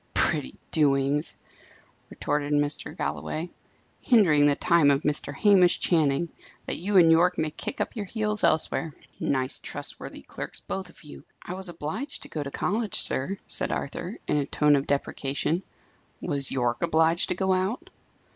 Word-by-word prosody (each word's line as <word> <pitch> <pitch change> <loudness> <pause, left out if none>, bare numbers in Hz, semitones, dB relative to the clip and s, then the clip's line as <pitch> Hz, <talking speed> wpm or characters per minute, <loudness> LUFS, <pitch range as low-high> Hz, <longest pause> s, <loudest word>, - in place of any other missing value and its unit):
"Pretty 65 - 0
doings!" 145 0 +1 0.7
retorted 145 0 -2
Mr. 145 0 -1
Galloway. 80 - -3 0.5
"Hindering 165 - +4
the 145 - +3
time 170 -3 +3
of 140 +1 +2
Mr. 150 -1 -1
Hamish 185 +3 +4
Channing, 160 -1 +1 0.4
that - - -3
you 195 +3 +1
and 165 -2 +7
Yorke 175 +2 +4
may 155 -1 -1
kick 160 - -6
up - - -2
your 210 -3 -4
heels 215 0 0
elsewhere! 160 -1 +1 0.2
Nice 130 -1 -1
trustworthy - - -6
clerks, - - -7
both 190 -2 -6
of - - -17
you!" 150 - -12 0.2
"I 180 - -5
was 190 0 -4
obliged 175 - -5
to - - -11
go 155 - -4
to 140 - -4
college, 210 +8 -1
sir," 185 +10 +4
said - - 0
Arthur, 175 +8 -4
in - - +1
a 145 - 0
tone 150 -1 +3
of 140 0 -1
deprecation. 140 +3 -1 0.6
"Was 140 -5 0
Yorke 120 -2 -1
obliged 165 0 +2
to - - 0
go 190 +1 +1
out?" 220 - -2
160 Hz, 160 wpm, -26 LUFS, 145-185 Hz, 0.7 s, and